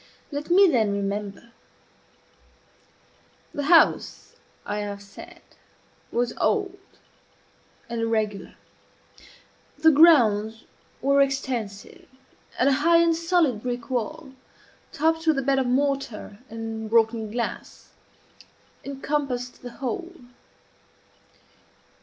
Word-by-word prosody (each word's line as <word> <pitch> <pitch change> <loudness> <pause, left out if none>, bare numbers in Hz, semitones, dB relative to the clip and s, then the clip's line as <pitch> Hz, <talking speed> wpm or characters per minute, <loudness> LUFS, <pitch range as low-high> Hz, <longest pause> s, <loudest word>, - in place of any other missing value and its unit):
Let 290 +2 -5
me 385 +3 +6
then 225 - +2
remember. 200 +2 -4 2.0
The 290 - -3
house, 330 +1 +3 0.3
I 210 - -3
have 205 -1 -5
said, 200 0 -13 0.7
was 240 0 -1
old 395 -2 0 1.1
and 235 -1 -4
irregular. 220 -3 -2 1.2
The 320 +2 +5
grounds 225 -9 +4 0.4
were 280 +1 +4
extensive, 255 -7 -3 0.5
and 255 - +2
a - - +5
high 335 +2 +5
and 335 -1 +3
solid 330 - +1
brick 245 +1 -5
wall, 275 +4 -3 0.6
topped 320 +2 0
with 315 -3 +4
a 275 - 0
bed 270 0 +2
of 260 - 0
mortar 260 -6 -2
and 225 -1 -6
broken 225 -1 +2
glass, 235 +2 -5 0.9
encompassed 275 -3 -3
the 245 - -7
whole. 275 +9 -5
250 Hz, 100 wpm, -24 LUFS, 220-300 Hz, 2.0 s, me